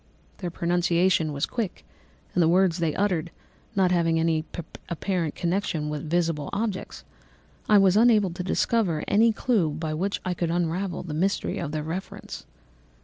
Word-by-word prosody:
Their 180 - -3
pronunciation 175 -1 +1
was 140 +1 -1
quick, 225 -7 -4 0.5
and 180 - +2
the 165 - +4
words 180 0 +3
they 165 -3 0
uttered, 180 -5 0 0.5
not 190 -2 +3
having 165 -2 +2
any 160 -1 +1 0.4
apparent 170 -2 -2
connection 170 -4 -1
with 150 +1 -5
visible 165 -3 0
objects, 205 -1 -3 0.7
I 210 - +7
was 195 -1 +5
unable 215 -4 +5
to 175 +2 -5
discover 185 -3 +1
any 225 +3 +4
clue 215 -7 +1
by 155 +1 -3
which 190 +6 -1
I 180 - 0
could 170 -1 -2
unravel 175 +2 -1
the 165 -4 -6
mystery 190 +6 0
of 150 -4 -3
their 155 0 -3
reference. 170 +5 -6
175 Hz, 155 wpm, -26 LUFS, 160-195 Hz, 0.7 s, I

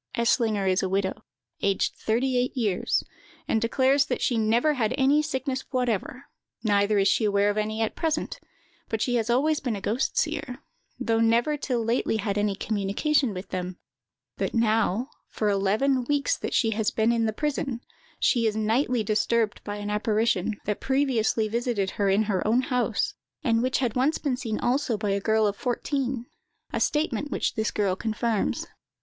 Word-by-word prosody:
"Eslinger 230 -3 +2
is 185 0 +2
a 190 - -1
widow, 190 0 -1 0.4
aged 200 -1 +1
thirty 250 +4 0
eight 250 +2 0
years, 210 -7 +1 0.4
and 220 - +1
declares 265 +4 +3
that - - -2
she 245 - +1
never 230 +7 +2
had 225 -6 0
any 280 +3 +4
sickness 265 -3 -2
whatever, 250 0 -2 0.4
neither 205 -1 +2
is 195 0 +3
she 220 - +2
aware 205 0 +3
of 205 - -5
any 215 +1 -1
at 220 - -2
present; 320 -2 -2 0.5
but 220 - -1
she 245 +3 0
has 230 -1 0
always 295 +6 +2
been 245 -5 -2
a - - -4
ghost 220 +6 -1
seer, 295 -5 -1 0.4
though 225 -1 +1
never 230 +6 +3
till 250 -5 -2
lately 230 -1 +1
had 205 -1 -2
any 205 -1 0
communication 220 +7 0
with 185 0 -7
them; 180 -1 -4 0.6
that - - -2
now, 225 0 +2 0.2
for 215 - -1
eleven 215 +7 +2
weeks 290 - +1
that - - -4
she 225 - +3
has 220 -1 0
been 220 +1 +1
in 230 -1 +1
the - - +1
prison, 275 -1 -2 0.4
she 235 -3 +3
is 215 - -1
nightly 225 +2 +1
disturbed 215 +1 0
by 205 - -4
an 205 0 -4
apparition, 215 -1 +1
that 210 0 -1
had - - -39
previously 255 -5 +1
visited 225 -4 -1
her 200 -1 0
in 200 +3 +3
her 205 -3 0
own 235 +4 +3
house, 250 -1 0 0.3
and 230 -5 +2
which 255 +1 +1
had 245 -4 0
been - - -1 0.3
once 260 -2 0
seen 220 -5 -2
also 245 -2 +1
by 205 -1 -1
a 200 0 0
girl 220 +1 +2
of 205 -1 0
fourteen—a 250 0 -4
statement 295 -3 0
which - - -1
this 220 -1 0
girl 200 -3 0
confirms. 220 0 -1
225 Hz, 180 wpm, -26 LUFS, 210-255 Hz, 0.6 s, any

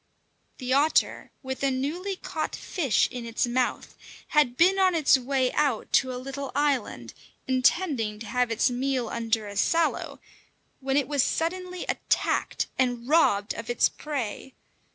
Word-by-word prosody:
The 255 -1 -2
otter, 290 +3 +2
with 265 0 -5
a 275 - +2
newly 315 +10 -2
caught 315 -4 -4
fish 290 - 0
in 250 -1 -6
its 230 +1 -1
mouth, 245 +1 -2 0.3
had 275 -5 +2
been 375 +3 +4
on 370 -2 +4
its 310 -4 +5
way 260 0 0
out 285 -6 0
to 260 -1 +3
a 250 - -4
little 275 +2 -6
island, 260 - -1 0.3
intending 255 - +1
to 225 - -9
have 250 +1 0
its 230 +3 +1
meal 255 -1 -1
under 225 -2 -1
a 205 - -8
sallow, 330 +10 0 0.6
when 270 0 0
it 280 -3 +1
was 285 -2 +1
suddenly 365 +5 -2
attacked - - -1
and 245 -2 0
robbed 225 -10 +3
of 230 0 -8
its 240 - +3
prey. 265 -3 -5
265 Hz, 155 wpm, -26 LUFS, 240-300 Hz, 0.6 s, its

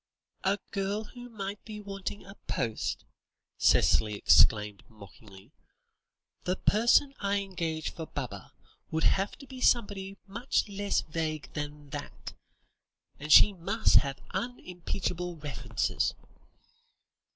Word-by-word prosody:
"A 195 +1 +2
girl 200 +2 -1
who 245 +2 -11
might 200 -2 -6
be 215 -1 -8
wanting 200 -1 -6
a 195 - -11
post," 115 -3 -2 0.5
Cicely 105 -1 +4
exclaimed 105 0 +4
mockingly; 100 +1 -15 0.9
"the 180 - 0
person 235 +8 +3
I 200 0 +1
engage 170 -5 -3
for 160 -2 -7
Baba, 135 -4 -6 0.4
would 160 0 -1
have 195 +1 +2
to 275 - -12
be 260 -2 -10
somebody 200 -5 +1
much 210 +6 -1
less 205 0 0
vague 155 -1 -4
than 145 -1 -6
that, - - -7 0.9
and 150 +2 -5
she 205 - +9
must 195 +5 +3
have 140 -1 +1
unimpeachable 180 -6 -4
references." 150 -2 -1
190 Hz, 115 wpm, -29 LUFS, 150-205 Hz, 0.9 s, she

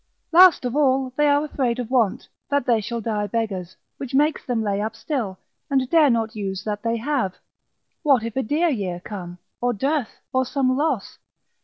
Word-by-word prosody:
Last 350 -4 +7
of 245 +1 -2
all, 265 -3 +2
they 295 +1 +3
are 290 +1 +3
afraid 255 -5 -1
of 245 -1 -5
want, 240 -2 +1 0.2
that 285 -3 +1
they 230 -3 +3
shall 235 +3 -4
die 210 -2 -1
beggars, 195 -6 -3 0.2
which 270 -1 -5
makes 300 +2 +2
them 235 -3 -1
lay 200 -1 -1
up 220 +1 -3
still, 220 -5 -3 0.3
and 265 -2 +1
dare 315 -4 +6
not 225 -1 0
use 195 -2 -4
that 210 -1 -3
they 230 0 0
have: 240 -6 -1 0.7
what 275 -8 +3
if 230 -1 -5
a 265 - +1
dear 305 +8 +1
year 195 - -2
come, 180 -2 -8 0.2
or 245 0 +1
dearth, 270 +2 -1
or 260 0 +3
some 255 0 0
loss? 285 -6 -1
245 Hz, 190 wpm, -23 LUFS, 215-280 Hz, 0.7 s, Last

